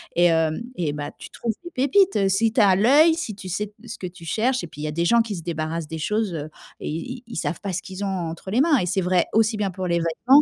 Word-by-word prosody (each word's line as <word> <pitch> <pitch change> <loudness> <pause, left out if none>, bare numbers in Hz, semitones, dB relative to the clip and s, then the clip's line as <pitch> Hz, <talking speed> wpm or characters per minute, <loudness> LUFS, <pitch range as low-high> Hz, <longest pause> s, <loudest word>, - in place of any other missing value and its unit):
et 175 +1 +5
hem, 160 +1 +2
et 165 -7 -1
bah, 145 -1 -5
tu - - -10
trouves 230 -1 -2
des 345 - -8
pépites, 275 - +3
si 220 +4 +2
tu 245 - +1
as 195 -3 +6
l'œil, 290 - +6
si 320 -11 -4
tu 190 -1 -9
sais 205 +4 -2
te 210 +3 -18
ce 230 - -6
que - - -6
tu 175 -1 -12
cherches. 245 +9 0
Et - - -5
puis, 150 -2 -11
il - - -4
y - - -1
a - - -2
des 170 +3 0
gens 235 +6 +5
qui 225 -3 -3
se - - -6
débarrassent 160 -1 -3
des 160 - -5
choses 210 +2 -1 0.5
et - - -4
ils 245 +11 -5
ils 235 - -7
savent 175 - -2
pas 200 - -3
ce - - -2
qu'ils 190 +1 -6
ont - - 0 0.2
entre 170 +3 -7
les 230 - +2
mains 305 -1 +4
et 185 - 0
c'est 190 +2 0
vrai, 180 -1 +2
aussi 220 0 +3
bien 200 -2 -1
pour 185 0 -4
les 170 -1 +1
vêtements 210 - +4
195 Hz, 295 wpm, -23 LUFS, 170-230 Hz, 0.5 s, as